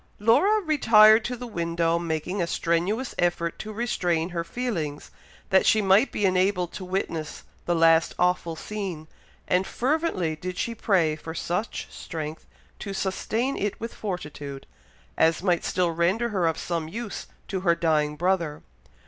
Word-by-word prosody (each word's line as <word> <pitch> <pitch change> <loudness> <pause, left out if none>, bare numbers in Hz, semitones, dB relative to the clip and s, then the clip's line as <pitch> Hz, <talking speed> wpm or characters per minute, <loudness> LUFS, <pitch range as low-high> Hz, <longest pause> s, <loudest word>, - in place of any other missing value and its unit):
Laura 380 - +4
retired 225 - +6
to 250 +2 -3
the 245 - -7
window, 170 -5 0
making 170 +3 -2
a 170 - 0
strenuous 175 +10 0
effort 170 -1 0
to 215 - -6
restrain 180 -7 -1
her 170 -2 -3
feelings, 165 -10 -4 0.4
that 190 - +5
she 220 - +5
might 200 +5 +4
be 205 - 0
enabled 185 -1 +2
to - - -6
witness 180 -4 -3 0.2
the 175 - +2
last 165 0 +4
awful 180 -2 +1
scene; 185 -5 -5 0.4
and 185 +1 +2
fervently 255 - 0
did 180 +3 -6
she 235 - -1
pray 180 -9 +2
for 160 +1 -8
such 180 +6 -3
strength 155 -1 -6 0.3
to 200 -2 -5
sustain 225 +7 -1
it 205 0 -2
with 230 +1 -5
fortitude, 150 -8 -6 0.5
as 165 +2 +3
might 175 -3 +2
still 180 -2 +1
render 180 +8 +1
her 185 -6 +1
of 160 - 0
some 165 -2 -3
use 220 +5 -6 0.2
to 190 - -2
her 170 -2 +3
dying 155 -3 +1
brother. 170 -2 0
180 Hz, 155 wpm, -26 LUFS, 165-215 Hz, 0.5 s, retired